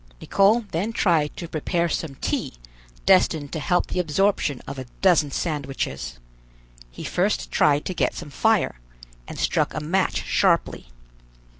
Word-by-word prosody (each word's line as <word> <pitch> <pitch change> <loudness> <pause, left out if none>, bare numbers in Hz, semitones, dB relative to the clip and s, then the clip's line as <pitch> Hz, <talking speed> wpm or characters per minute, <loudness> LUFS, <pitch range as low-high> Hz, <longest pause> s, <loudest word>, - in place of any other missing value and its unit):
Nicholl 210 - +3
then 190 +8 -1
tried 165 -9 +1
to 170 - -5
prepare 170 +2 -1
some 160 -3 -3
tea - - -2 0.5
destined 165 -6 +3
to 160 - -2
help 175 +3 +1
the - - -3
absorption 165 -4 +1
of 140 -1 -7
a 130 - -6 0.2
dozen 170 -6 +4
sandwiches. 135 - -3 0.7
He - - -10
first 195 +4 -1
tried 145 -1 +3
to 185 - -2
get - - 0
some 150 -4 -8
fire, 220 - +1 0.5
and - - -8
struck - - 0
a - - -1
match 175 +6 0
sharply. 170 - +1
165 Hz, 145 wpm, -24 LUFS, 145-190 Hz, 0.7 s, dozen